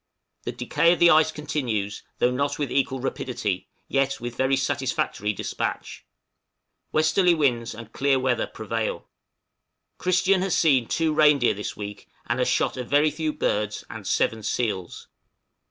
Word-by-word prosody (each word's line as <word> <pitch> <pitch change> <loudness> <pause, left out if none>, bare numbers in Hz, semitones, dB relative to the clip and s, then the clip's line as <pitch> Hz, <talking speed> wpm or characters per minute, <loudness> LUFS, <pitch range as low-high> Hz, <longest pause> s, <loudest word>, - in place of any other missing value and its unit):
The - - -2
decay 170 +1 +2
of - - -2
the 175 0 +7
ice 155 0 +5
continues, 125 -10 -3 0.2
though 125 - +2
not 140 +3 -1
with 145 -4 -2
equal 135 -1 0
rapidity, 120 -7 -3 0.2
yet 135 0 0
with 120 0 -6
very 130 +1 +2
satisfactory 105 -5 -1
despatch. 100 - -4 0.9
Westerly 165 +3 +3
winds 120 -7 0
and 115 0 -11
clear 135 +1 +2
weather 130 -2 0
prevail. 110 0 -4 0.9
Christian 185 +1 +2
has 190 -2 +1
seen 135 -8 +3
two 160 -2 0
reindeer 150 -5 +4
this 105 +1 -6
week, 105 -1 -8 0.2
and 120 - -1
has 125 - +2
shot - - +1
a 125 - -3
very 145 +4 +3
few 155 +1 -2
birds, 105 -6 -1
and - - -8
seven 110 -1 +1
seals. 105 -4 -3
130 Hz, 150 wpm, -25 LUFS, 115-155 Hz, 0.9 s, the